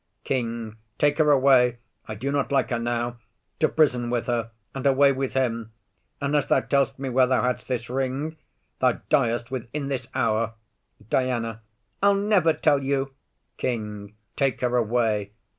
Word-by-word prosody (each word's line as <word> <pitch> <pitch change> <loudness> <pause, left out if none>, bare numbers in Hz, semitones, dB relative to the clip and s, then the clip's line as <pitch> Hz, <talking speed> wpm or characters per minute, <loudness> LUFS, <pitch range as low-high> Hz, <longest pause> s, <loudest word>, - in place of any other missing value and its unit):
KING. 115 -4 -3 0.2
Take 145 +1 +2
her 155 -1 +4
away, 130 -3 +5 0.3
I 110 - -5
do 135 +7 -3
not 140 0 0
like 135 -1 +1
her 120 - 0
now. 120 0 -2 0.4
To 155 - +3
prison 125 -6 +2
with 120 -1 -1
her. 120 -2 -1 0.2
And 135 0 -1
away 140 +1 +5
with 135 -1 -2
him. 115 -4 -1 0.5
Unless 145 0 +1
thou - - +3
tell'st 135 -1 +1
me 135 0 -4
where 130 0 +4
thou 130 0 +2
hadst 125 0 -1
this 120 -2 -2
ring, 135 +5 -2 0.4
Thou - - +4 0.2
diest 120 +1 +2
within 135 +3 -4
this 130 -3 -3
hour. 115 0 0 0.5
DIANA. 115 -3 -1 0.4
I'll 200 0 +5
never 200 -5 +3
tell 145 -2 +2
you. 135 0 -1 0.4
KING. 105 -4 -4 0.2
Take 135 -4 0
her 125 -1 +1
away. 110 -3 +1
125 Hz, 160 wpm, -25 LUFS, 115-140 Hz, 0.5 s, away